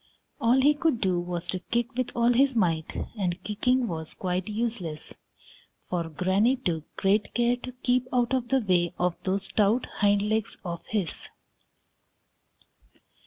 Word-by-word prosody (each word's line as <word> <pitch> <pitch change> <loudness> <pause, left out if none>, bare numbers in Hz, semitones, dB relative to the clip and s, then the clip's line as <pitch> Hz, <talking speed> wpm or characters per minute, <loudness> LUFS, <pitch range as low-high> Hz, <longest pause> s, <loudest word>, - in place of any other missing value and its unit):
All 235 +3 +4
he 290 +3 +6
could 305 -5 +1
do 185 -4 +1
was 175 0 -4
to 185 - -1
kick 235 +5 -2
with 255 0 -1
all 235 +1 +4
his 265 +1 +3
might, 165 -7 0 0.2
and 180 -1 -1
kicking 250 +4 +1
was 160 -4 -5
quite 185 +1 -2
useless, 210 -8 -3 0.8
for 170 -2 -1
Granny 190 - +2
took 170 - -3
great 200 +2 +1
care 240 0 +3
to 255 +1 -7
keep 250 0 0
out 245 0 +1
of 255 -2 0
the 265 +1 +2
way 180 -4 +1
of 180 -1 +1
those 195 +1 -1
stout 215 +5 +2 0.2
hind 205 0 +4
legs 215 0 -1
of 170 -1 -4
his. 200 -7 -2
210 Hz, 155 wpm, -27 LUFS, 180-245 Hz, 0.8 s, he